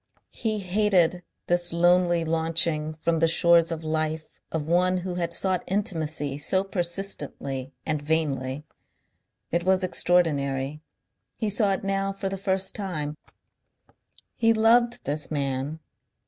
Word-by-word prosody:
He 220 -2 -2
hated 185 -3 +2 0.2
this 175 0 +1
lonely 175 0 +3
launching 160 -1 0
from 165 +1 0
the 165 - +4
shores 170 0 +4
of 165 -1 -4
life 155 0 -3
of 160 -2 -2
one 180 +3 +2
who 185 - -3
had 170 -1 -2
sought 185 +1 +1
intimacy 160 -7 -2
so 190 +6 +1
persistently 170 -8 -3
and 155 -2 -1
vainly. 145 -3 -1 0.9
It 170 +1 0
was 190 +1 +2
extraordinary 150 -6 +1 0.5
he 215 -3 -1
saw 200 -1 +3
it 190 - -4
now 195 0 -1
for 195 0 -4
the 195 - -3
first 190 -1 0
time 155 -7 -4 1.2
he 225 -1 +3
loved 235 +2 +3
this 150 +1 -1
man. 140 +1 -2
170 Hz, 130 wpm, -25 LUFS, 155-190 Hz, 1.2 s, the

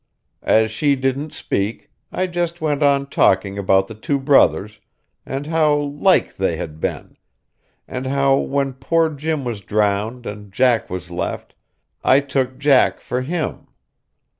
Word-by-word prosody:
As 110 0 +3
she 140 +6 +1
didn't 135 +3 -2
speak, 100 +4 -3 0.2
I 185 - -1
just 175 -1 -2
went 150 -2 -1
on 140 -1 +3
talking 100 -6 +1
about 95 0 +2
the 110 - -8
two 125 +6 -2
brothers, 120 -7 +2 0.5
and 135 +2 -4
how 155 -1 +2
like 145 +6 +1
they 95 -3 0
had 80 -2 -7
been, - - -4 0.7
and 130 +1 -5
how 140 0 +3
when 140 -1 -1
poor 160 +5 +1
Jim 150 0 -3
was 115 -4 -4
drowned 105 +4 -1
and 105 -1 -8
Jack 120 +2 +2
was 90 -1 -6
left, 85 0 -4 0.5
I 135 - +5
took 135 -2 -2
Jack 140 -3 +3
for 125 - -3
him. 160 +4 -4
135 Hz, 145 wpm, -20 LUFS, 105-145 Hz, 0.7 s, I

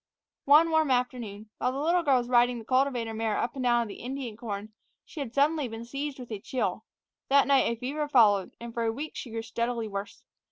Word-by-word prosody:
One 310 +4 +6
warm 315 -2 +3
afternoon, 235 -5 -2
while 250 - +1
the 265 - -5
little 340 +4 +2
girl 280 -5 +3
was 240 -1 -2
riding 245 0 +3
the 225 - -9
cultivator 255 -3 +1
mare 220 -1 -1
up 235 - -1
and 270 - -5
down 240 -1 +3
in - - -7
the 200 - -9
Indian 255 -3 -5
corn, 215 -2 -6 0.3
she 320 - -10
had 270 -5 -4
suddenly 285 +2 +2
been 225 0 -7
seized 275 +3 -4
with 250 -3 -10
a 210 - -4
chill. 250 +4 -2 0.4
That 280 +1 +5
night 275 -4 +3
a - - -2
fever 285 +6 -3
followed, 210 -8 +4
and 235 0 -8
for 235 - -1
a 225 - +1
week 290 +7 -5
she 250 - -6
grew 225 0 -4
steadily 230 0 -2
worse. 205 +2 -6
245 Hz, 230 wpm, -28 LUFS, 225-275 Hz, 0.4 s, One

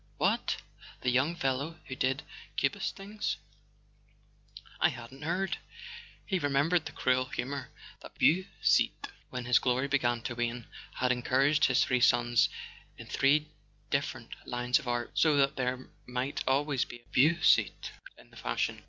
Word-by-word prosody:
What? - - +1 0.5
The 125 - +1
young 135 +7 +2
fellow 140 +2 -2
who 130 - -6
did 130 +1 0 0.3
Cubist - - 0
things? 210 +2 -4 1.4
I - - +5
hadn't 130 +2 -10
heard.. 180 +5 -1 0.7
He 190 -2 0
remembered 145 +3 +2
the - - -7
cruel 130 0 +1
rumour 135 +1 -3 0.3
that - - -12
Beausite, 185 +4 +2 0.2
when 125 -1 -5
his 125 -1 +5
glory 130 +2 +1
began 120 -5 +1
to 120 - -3
wane, 120 -1 -3 0.3
had 125 0 +1
encouraged 135 +4 +3
his 130 +1 +4
three 125 -1 +1
sons 120 -2 +4 0.5
in - - -9
three 145 +3 +2 0.4
different 130 -4 -2 0.2
lines 125 +2 +1
of 145 - -11
art, 120 0 -1
so 155 -3 +3
that 140 +1 +3
there 125 0 -2 0.2
might 125 +2 -2
always 140 0 +2
be 120 - -10
a - - -32
Beausite 155 +6 +3 0.3
in - - -18
the - - -15
fashion. - - -2
130 Hz, 145 wpm, -30 LUFS, 125-145 Hz, 1.4 s, I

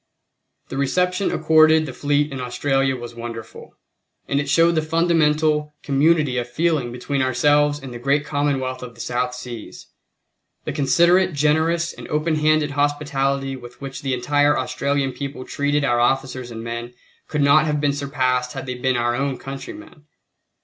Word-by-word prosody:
The - - -5
reception 180 +7 +1
accorded 155 0 +4
the 130 - -7
fleet 145 +2 0
in 135 -1 -5
Australia 135 +2 0
was 120 -1 -8
wonderful, 115 -1 -9 0.5
and 140 - +1
it 140 0 -3
showed 165 +3 +4
the 160 - +1
fundamental 155 -2 +1
community 145 -2 +2
of 120 0 -5
feeling 155 -3 0
between 130 +3 -2
ourselves 145 +3 +3
and 135 -4 -9
the 120 - -7
great 140 +4 +1
commonwealth 135 -3 -1
of 120 -2 -9
the - - -18
South 125 +1 -2
Seas. 125 -3 -9 0.8
The - - -3
considerate, 175 +6 +3
generous, 160 +4 +1
and - - -10
open 155 +2 0
handed 155 -1 +2
hospitality 140 -2 -1
with 125 -1 -12
which 135 -1 -7
the 135 -2 -1
entire 145 +3 +2
Australian 140 +1 -1
people 140 -1 -6
treated 145 0 0
our 120 -2 +2
officers 130 0 0
and 115 -1 -7
men 120 +1 -6 0.3
could 150 - -1
not 155 +2 +5
have 150 -1 0
been 145 -1 +1
surpassed 130 -3 -1
had 135 - -6
they 125 - -4
been 125 0 0
our 120 0 +1
own 135 +1 -1
countrymen. 150 - -9
140 Hz, 165 wpm, -21 LUFS, 125-150 Hz, 0.8 s, not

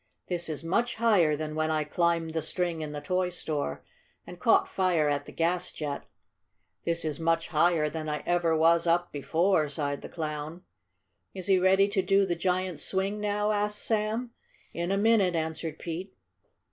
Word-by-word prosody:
"This 175 -2 -2
is 155 0 -4
much 235 +9 0
higher 200 -10 +3
than 155 0 -4
when 155 0 0
I 155 -1 +1
climbed 165 +1 0
the 160 0 -1
string 175 -1 -2
in 150 -1 -5
the 145 0 -5
toy 180 +4 0
store 150 - -3 0.4
and - - -10
caught - - +4
fire 180 -5 +1
at 145 -1 -1
the - - -8
gas 175 +2 0
jet. 145 -2 -5 0.8
This 170 -1 0
is 150 -1 -2
much 165 0 0
higher 165 -1 +3
than 155 0 -4
I 150 -1 -3
ever 175 -2 +2
was 165 +1 +4
up 175 +1 +2
before," 160 +2 +1
sighed 145 -1 -3
the - - -8
Clown. 155 +1 -5 0.7
"Is 185 -2 -3
he 190 -1 +4
ready 190 +2 +4
to 200 -1 +1
do 195 +1 +3
the 175 -2 -1
giant's 180 -1 -1
swing 195 +2 -1
now?" 210 0 0
asked 210 0 0
Sam. 220 +2 -1 0.4
"In 170 +2 -2
a 195 - +2
minute," 205 -4 +3
answered 160 -1 -3
Pete. 180 +3 -6
170 Hz, 180 wpm, -28 LUFS, 155-190 Hz, 0.8 s, caught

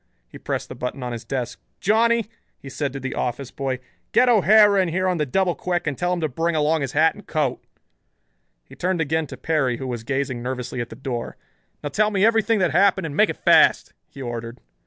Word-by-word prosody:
He - - -12
pressed - - -3
the - - -8
button 125 +1 -5
on 125 - -4
his 120 0 -6
desk. 130 -3 -4 0.2
"Johnny," 230 +2 +3 0.3
he 135 - -11
said 145 -1 -2
to 135 - -6
the 130 0 -4
office 125 +1 -3
boy, 135 -2 -3 0.4
"get 250 - +5
O'Hara 210 -2 +6
in 185 - 0
here 185 +3 0
on 180 -2 0
the 150 - 0
double 185 +5 +1
quick 175 -1 -2
and 150 -3 -1
tell 175 +6 -1
him 180 -1 -1
to 155 - +1
bring 165 +5 -1
along 155 +1 +2
his 135 -2 -3
hat 160 +2 +4
and - - -15
coat." - - -1 1.0
He - - -16
turned 180 0 -1
again 160 0 0
to 130 - -9
Perry, 135 -4 0
who 130 - -6
was 120 -3 -4
gazing 135 -1 -2
nervously 125 0 -4
at 120 - -5
the - - -9
door. 125 -2 -5 0.5
"Now 145 - -2
tell 210 +8 +2
me 200 -1 +2
everything 225 -1 +3
that 180 -5 +1
happened 190 +2 +3
and 150 -3 -5
make - - +4
it - - -4
fast," - - +4 0.2
he 135 - -9
ordered. 120 0 -6
150 Hz, 225 wpm, -23 LUFS, 130-185 Hz, 1.0 s, O'Hara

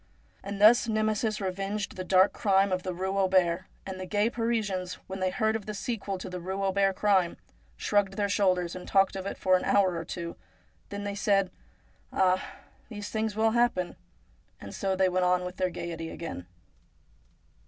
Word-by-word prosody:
And 200 0 -6
thus 225 +3 +7
Nemesis 215 0 0
revenged 195 +1 -3
the 185 - -4
dark 190 +2 +4
crime 195 -1 +2
of 185 0 0
the 185 - -3
Eue 190 +2 -2
Auber, 185 -2 +2 0.2
and 190 -1 -6
the 185 - -5
gay 210 +4 +1
Parisians, 210 -6 -1
when 190 0 -6
they 185 0 +1
heard 220 +3 0
of 220 -2 -5
the 210 - -4
sequel 205 -3 -3
to 185 - -7
the 180 0 -5
Eue 190 +3 -3
Auber 195 0 +2
crime, 190 -3 +2 0.4
shrugged 200 -2 +1
their 205 -1 +1
shoulders, 185 -4 +1
and 180 - -8
talked 195 0 +3
of 190 0 -4
it - - -4
for 185 0 +3
an 180 - 0
hour 190 -3 +3
or 165 - -3
two; 170 0 -6 0.5
then 200 0 -5
they 205 0 -3
said: 200 -2 +2 0.3
' - - -35
Ah, 185 0 +2 0.5
these 205 -2 -6
things 220 -1 -2
will 220 +1 +3
happen! 235 -6 +1 0.3
' - - -36
and 100 - -9
so 195 -1 -1
they 190 0 +3
went 185 0 +1
on 180 0 +2
with 180 0 -6
their 185 -1 +1
gaiety 165 -2 -5
again. 155 - -7
195 Hz, 195 wpm, -28 LUFS, 185-205 Hz, 0.5 s, thus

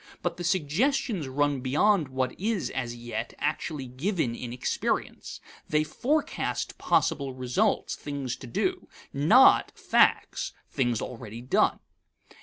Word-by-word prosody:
But 175 -1 -1
the 175 - -5
suggestions 185 - 0
run 145 +1 +1
beyond 155 +6 +3
what 130 -1 -1
is, 210 0 -1
as 120 -3 -3
yet, 120 -1 -5
actually 150 -1 -2
given 135 - -1
in 120 0 -6
experience. 125 - -2 0.3
They 155 0 +3
forecast 280 - -2
possible 135 -3 +1
results, 130 - 0
things 140 -4 -4
to 130 - -10
do, 115 - -1 0.3
not 165 - +6
facts - - +2 0.2
(things 120 -4 0
already 115 -2 -7
done). 125 - +2
140 Hz, 120 wpm, -27 LUFS, 125-175 Hz, 0.3 s, not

